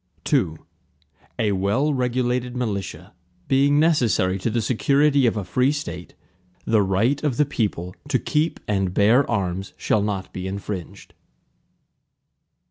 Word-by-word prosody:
II 80 - +2 0.8
A 105 -2 +1
well 100 +10 +1
regulated 125 -1 -1
militia, 100 -8 -4 0.3
being 140 +2 +3
necessary 120 - +2
to 115 - -1
the 115 +2 0
security 140 +4 +2
of 115 - 0
a 105 - -2
free 125 +9 +1
State, 90 - -6 0.5
the 110 -2 +3
right 105 +10 +1
of 145 -5 0
the 150 - +4
people 95 -9 -3
to - - +2
keep 155 +2 -1
and 95 -3 -1
bear 115 +7 +4
arms, 95 -3 -2
shall 110 - +1
not 100 -2 -3
be 95 0 -5
infringed. 95 -2 -6
110 Hz, 130 wpm, -23 LUFS, 95-135 Hz, 0.8 s, the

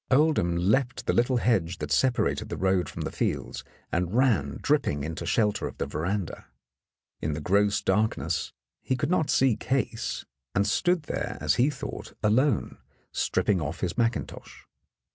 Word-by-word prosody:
Oldham 135 - +3
leaped 120 +8 +1
the - - +1
little 120 +1 +2
hedge 95 -8 +1
that 75 -1 -5
separated 125 - +1
the - - -4
road 95 -3 +1
from - - -5
the - - -3
fields - - -2 0.3
and 90 +3 -1
ran 110 - +2
dripping 135 - +1
into 80 +1 -4
shelter 105 -3 +1
of - - -9
the - - -1
veranda. 90 +4 -3 0.7
In 75 - -1
the 75 - -3
gross 100 +6 +2
darkness 95 -6 0 0.3
he 130 - -1
could 145 +5 -1
not 160 -5 +2
see 130 -4 +4
Case, 130 0 -2 0.3
and 100 - +3
stood 175 - +1
there, - - -3
as - - +2
he 135 - +4
thought, 135 -4 -6
alone, 130 +7 +2 0.3
strip - - 0
ping 95 -5 +2
off 80 +3 -4
his 90 -2 -1
mackintosh. 115 0 -2
105 Hz, 160 wpm, -27 LUFS, 85-130 Hz, 0.7 s, see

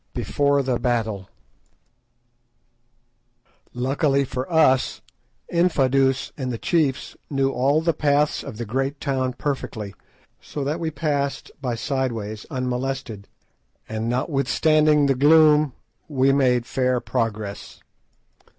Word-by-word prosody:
BEFORE 140 -1 +1
THE 125 -2 -1
BATTLE 110 -6 -1 2.4
Luckily 135 +2 +1
for 130 +4 -5
us, 150 -6 +3 0.5
Infadoos 135 -6 +2
and 130 -3 -3
the 115 - -3
chiefs 140 -3 0
knew 135 -1 +1
all 135 +5 +2
the 165 0 +1
paths 145 0 +1
of 130 -6 -8
the 120 - -4
great 135 +5 -2
town 130 -3 -1
perfectly, 110 -8 -4 0.5
so 145 - -5
that 150 +4 -2
we 165 -1 -1
passed 140 -2 -2
by 125 -4 -2
side 130 +1 -1
ways 110 -1 -6
unmolested, 130 -5 -3 0.6
and 110 +1 -3
notwithstanding 150 +3 +2
the 140 - +3
gloom 150 +1 +5 0.3
we 135 -2 +2
made 125 -3 +2
fair 125 -1 0
progress. 110 -5 -4
135 Hz, 115 wpm, -23 LUFS, 125-145 Hz, 2.4 s, gloom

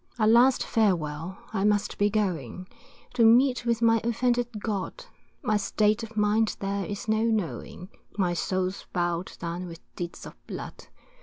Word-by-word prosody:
A 220 - +2
last 240 +4 +5
farewell, 175 -4 0 0.2
I 195 -2 0
must 205 -1 +1
be 205 0 +4
going, 185 - -2 0.5
To 245 -2 +3
meet 250 +3 +5
with 235 0 +1
my 225 -1 +4
offended 240 +1 +1
God, 205 -2 -4 0.4
My 215 - +2
state 210 +1 +1
of 225 -1 -8
mind 210 +1 +2
there 195 0 -2
is 205 +1 -5
no 220 0 +2
knowing, 210 -4 -2 0.3
My 180 -3 +1
soul's 185 +2 -2
bow'd 175 0 -2
down 170 +1 -4
with 165 -1 -10
deeds 175 -1 -6
of - - -9
blood. - - -8
210 Hz, 155 wpm, -27 LUFS, 185-225 Hz, 0.5 s, last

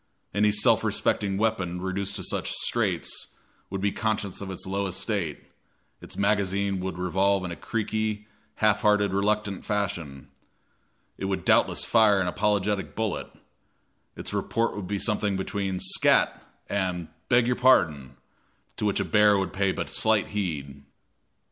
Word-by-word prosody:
Any 105 +1 +3
self 105 0 +3
respecting 100 -2 0
weapon 95 -5 0
reduced 95 +1 -3
to - - -4
such - - -2
straits - - -2 0.4
would 95 0 -4
be 100 0 +1
conscious 105 -3 -2
of 100 - -5
its 95 - -6
low 100 +1 -1
estate; 95 -3 -2 0.6
its - - -9
magazine 100 -1 +1
would 95 0 -4
revolve 95 +2 +1
in 90 - -4
a - - -4
creaky, 110 0 -2 0.3
half 105 -1 +2
hearted, 105 -3 +3
reluctant 105 0 0
fashion; 85 -10 -3 0.9
it - - -3
would 95 0 -2
doubtless - - +3
fire 110 -3 +4
an 95 - +1
apologetic 100 +2 0
bullet; 110 -4 -2 0.8
its - - -5
report 115 0 0
would 100 -3 -5
be 100 - -1
something 105 -2 0
between 95 -1 -2
"scat" - - +3 0.3
and 90 -4 -2 0.2
"beg 120 -1 +5
your 125 +1 +1
pardon," 80 - +3 0.6
to - - -2
which 100 - +1
a - - 0
bear 105 -1 +5
would 95 -2 -2
pay 95 0 +1
but - - -4
slight 110 -2 +2
heed. 75 -9 -4
100 Hz, 150 wpm, -26 LUFS, 95-105 Hz, 0.9 s, beg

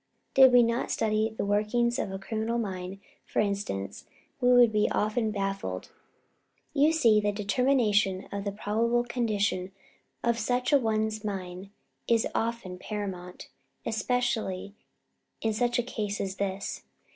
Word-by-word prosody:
Did 265 -1 +8
we 245 -1 +7
not 235 +2 0
study 215 0 +1
the - - -1
workings 235 +5 +1
of 195 - -2
a 195 - -4
criminal's 220 +4 -2
mind, 190 -3 -4 0.3
for - - -3
instance, 195 - -2 0.3
we 250 -1 +4
would 240 -3 +6
often 215 +2 0
be 210 - -4
baffled. 195 - -3 0.8
You 295 +3 +4
see, 235 -10 +4
the 205 0 +1
determination 205 -2 +1
of 200 0 -3
the 200 - -2
probable 230 +4 0
condition 210 -6 -1 0.5
of 235 0 +1
such 250 +4 0
a 285 - +7
one's 220 -2 -1
mind 190 -2 -5 0.4
is 230 -1 +3
often 225 -6 -2
paramount, 185 -4 -6 0.4
especially 220 -5 -1 0.7
in 220 -1 0
such 240 +3 +1
a 245 - +1
case 210 -4 -3
as 190 -1 -3
this. 195 0 -3
215 Hz, 140 wpm, -28 LUFS, 195-235 Hz, 0.8 s, Did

